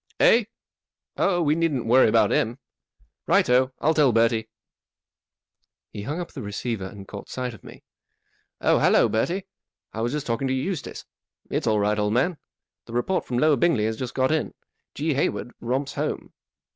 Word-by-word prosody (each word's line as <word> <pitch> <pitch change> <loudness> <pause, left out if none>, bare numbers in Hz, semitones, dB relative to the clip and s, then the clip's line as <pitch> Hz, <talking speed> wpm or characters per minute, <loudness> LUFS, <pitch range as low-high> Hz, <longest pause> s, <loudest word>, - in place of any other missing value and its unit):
" - - -34
Eh? 230 -1 +5 0.7
Oh, 175 -3 +1
we 150 -1 +3
needn't 155 -7 0
worry 120 +1 +5
about 115 +1 +3
him. 115 +3 +1 0.7
Right - - +4
o, 130 +1 +4
I'll 160 +3 +2
tell 150 -5 +4
Bertie." 115 -1 +2 1.4
He 105 - -7
hung 145 - -4
up 175 - -6
the - - -7
receiver 105 0 -4
and 95 0 -11
caught 100 - -9
sight 125 -1 -4
of 105 - -14
me. - - -13 0.4
" - - -47 0.3
Oh, - - +3
hallo, - - +4
Bertie; 175 - -1 0.5
I 110 - -4
was 120 +1 0
just 150 0 -3
talking 125 +3 -1
to 130 - 0
Eustace. 150 +4 -4 0.5
It's - - -1
all 110 -1 +3
right, 105 +1 +1
old 105 0 +1
man. 145 +8 +1 0.5
The 115 - -11
report 120 +11 0
from 125 - -2
Lower 150 +2 +4
Bingley 125 -7 +2
has 110 0 -1
just 125 +2 -6
got 130 +1 +2
in. 160 -1 -1 0.4
G. 155 +1 0
Hayward 130 -2 -1
romps 130 +4 -2
home." - - -4
125 Hz, 185 wpm, -24 LUFS, 110-150 Hz, 1.4 s, Eh